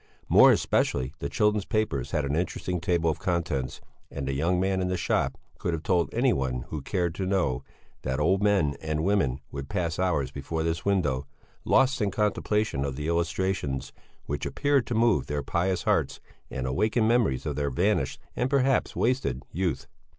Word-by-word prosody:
More -, -, +8 dB
especially 65 Hz, +2 st, +1 dB
the 70 Hz, -, -3 dB
children's 105 Hz, -1 st, +2 dB
papers 110 Hz, -, -1 dB
had 75 Hz, -, 0 dB
an 70 Hz, +1 st, -1 dB
interesting 90 Hz, +1 st, -2 dB
table 85 Hz, -1 st, +1 dB
of 75 Hz, -, -6 dB
contents, 80 Hz, -8 st, -2 dB, 0.3 s
and 70 Hz, -1 st, -5 dB
the 70 Hz, -, -1 dB
young 85 Hz, +6 st, +1 dB
man 95 Hz, 0 st, +1 dB
in 90 Hz, -, 0 dB
the 90 Hz, 0 st, -1 dB
shop -, -, 0 dB, 0.2 s
could 85 Hz, -, -1 dB
have 80 Hz, -1 st, -3 dB
told 85 Hz, -2 st, +1 dB
anyone 65 Hz, -, 0 dB
who 75 Hz, -2 st, -4 dB
cared 85 Hz, +1 st, -1 dB
to 95 Hz, +2 st, -3 dB
know 90 Hz, -10 st, 0 dB, 0.4 s
that 65 Hz, +1 st, -2 dB
old 95 Hz, +6 st, +2 dB
men 100 Hz, -9 st, +2 dB
and 80 Hz, 0 st, -2 dB
women 80 Hz, -9 st, +1 dB
would 70 Hz, -1 st, -6 dB
pass 85 Hz, -4 st, -2 dB
hours 75 Hz, -8 st, +1 dB
before 80 Hz, +4 st, -3 dB
this 80 Hz, -1 st, -1 dB
window, 75 Hz, -9 st, 0 dB, 0.4 s
lost 135 Hz, -1 st, +3 dB
in 105 Hz, -, +2 dB
contemplation 105 Hz, -5 st, 0 dB
of 70 Hz, -2 st, -3 dB
the 75 Hz, +2 st, -4 dB
illustrations, 85 Hz, -4 st, -1 dB, 0.3 s
which 75 Hz, 0 st, -3 dB
appeared 145 Hz, -3 st, +1 dB
to 120 Hz, -, -2 dB
move 115 Hz, -2 st, +3 dB
their 75 Hz, -1 st, -2 dB
pious 90 Hz, +5 st, 0 dB
hearts -, -, +1 dB, 0.3 s
and 65 Hz, 0 st, -4 dB
awaken 110 Hz, -, +1 dB
memories 115 Hz, -, +2 dB
of 75 Hz, -3 st, -2 dB
their 70 Hz, 0 st, 0 dB
vanished 65 Hz, -, 0 dB, 0.2 s
and 125 Hz, -, 0 dB
perhaps 135 Hz, -1 st, +2 dB
wasted 115 Hz, -, 0 dB
youth. 90 Hz, +2 st, -1 dB
85 Hz, 180 wpm, -27 LUFS, 70-100 Hz, 0.4 s, More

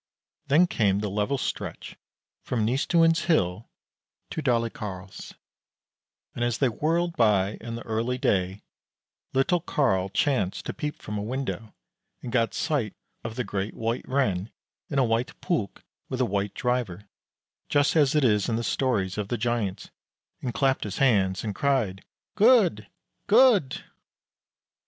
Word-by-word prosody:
Then 150 Hz, +6 st, +5 dB
came 105 Hz, -, +1 dB
the 105 Hz, -1 st, -2 dB
level 105 Hz, +7 st, 0 dB
stretch -, -, -5 dB, 0.5 s
from 115 Hz, -4 st, -1 dB
Nystuen's 165 Hz, +7 st, +3 dB
hill 110 Hz, -, +1 dB, 0.6 s
to -, -, -3 dB
Dalecarl's, 110 Hz, -7 st, -3 dB, 1.0 s
and 120 Hz, -, -3 dB
as 120 Hz, -1 st, 0 dB
they 135 Hz, -, +2 dB
whirled 165 Hz, +7 st, 0 dB
by 105 Hz, -3 st, +2 dB
in 115 Hz, 0 st, -5 dB
the 115 Hz, -, -7 dB
early 115 Hz, +3 st, -1 dB
day, 95 Hz, -4 st, 0 dB, 0.7 s
little 135 Hz, +7 st, +2 dB
Carl 100 Hz, -, +1 dB
chanced 105 Hz, -, 0 dB
to -, -, -3 dB
peep 150 Hz, 0 st, -4 dB
from 105 Hz, -1 st, -4 dB
a -, -, -3 dB
window, 115 Hz, -1 st, -4 dB, 0.5 s
and 120 Hz, -, -5 dB
got 115 Hz, -2 st, +1 dB
sight 135 Hz, -, -1 dB, 0.3 s
of 115 Hz, 0 st, -5 dB
the 125 Hz, -, -1 dB
Great 100 Hz, -1 st, -3 dB
White 115 Hz, +2 st, -2 dB
Ren 110 Hz, -8 st, 0 dB, 0.4 s
in 140 Hz, -, -2 dB
a 135 Hz, -, +4 dB
white 115 Hz, +2 st, -1 dB
pulk 115 Hz, -, -2 dB, 0.3 s
with 130 Hz, -, -3 dB
a 130 Hz, -, +3 dB
white 100 Hz, -1 st, -2 dB
driver, 120 Hz, -6 st, -2 dB, 0.6 s
just 145 Hz, +1 st, +2 dB
as 145 Hz, -2 st, +4 dB
it 150 Hz, -, +3 dB
is 105 Hz, -4 st, +3 dB
in 115 Hz, -, +1 dB
the 115 Hz, -, -2 dB
stories 105 Hz, -8 st, 0 dB
of 105 Hz, -, -2 dB
the 120 Hz, -, -2 dB
Giants, 115 Hz, -5 st, -2 dB, 0.5 s
and 125 Hz, -, -2 dB
clapped 135 Hz, +2 st, +1 dB
his 100 Hz, -2 st, -5 dB
hands, 95 Hz, -8 st, +2 dB
and 105 Hz, -2 st, -3 dB
cried, 115 Hz, -8 st, 0 dB, 0.3 s
"Good, 205 Hz, -, +4 dB, 0.4 s
good!" 215 Hz, -, +4 dB
120 Hz, 145 wpm, -26 LUFS, 105-140 Hz, 1.0 s, Then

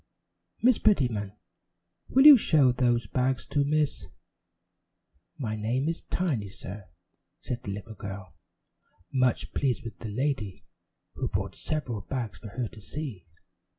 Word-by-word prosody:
Miss 250 Hz, -1 st, +5 dB
Prettyman, 120 Hz, -, +2 dB, 0.8 s
will 265 Hz, +2 st, +5 dB
you 300 Hz, -1 st, +13 dB
show 150 Hz, -, +4 dB
those 120 Hz, -2 st, +2 dB
bags 130 Hz, +4 st, 0 dB
to 145 Hz, -, +1 dB
Miss 150 Hz, 0 st, 0 dB, 0.7 s
" 70 Hz, +3 st, -47 dB
"My 110 Hz, 0 st, -2 dB
name 120 Hz, +6 st, -1 dB
is 165 Hz, 0 st, -2 dB
Tiny, 135 Hz, -, -1 dB
sir," 95 Hz, +1 st, -9 dB, 0.5 s
said 120 Hz, -1 st, -4 dB
the 100 Hz, -, -5 dB
little 105 Hz, +3 st, -7 dB
girl, 95 Hz, -2 st, -8 dB, 0.8 s
much 130 Hz, -2 st, +1 dB
pleased 135 Hz, -4 st, 0 dB
with 115 Hz, -5 st, -8 dB
the 110 Hz, -, -6 dB
lady, 105 Hz, -6 st, -2 dB, 0.5 s
who -, -, -3 dB
brought -, -, -2 dB
several 125 Hz, -9 st, -3 dB
bags 115 Hz, -1 st, -4 dB
for 110 Hz, -, -9 dB
her 120 Hz, +4 st, -3 dB
to 110 Hz, -, -13 dB
see. 115 Hz, -, -6 dB
120 Hz, 140 wpm, -28 LUFS, 105-140 Hz, 0.8 s, you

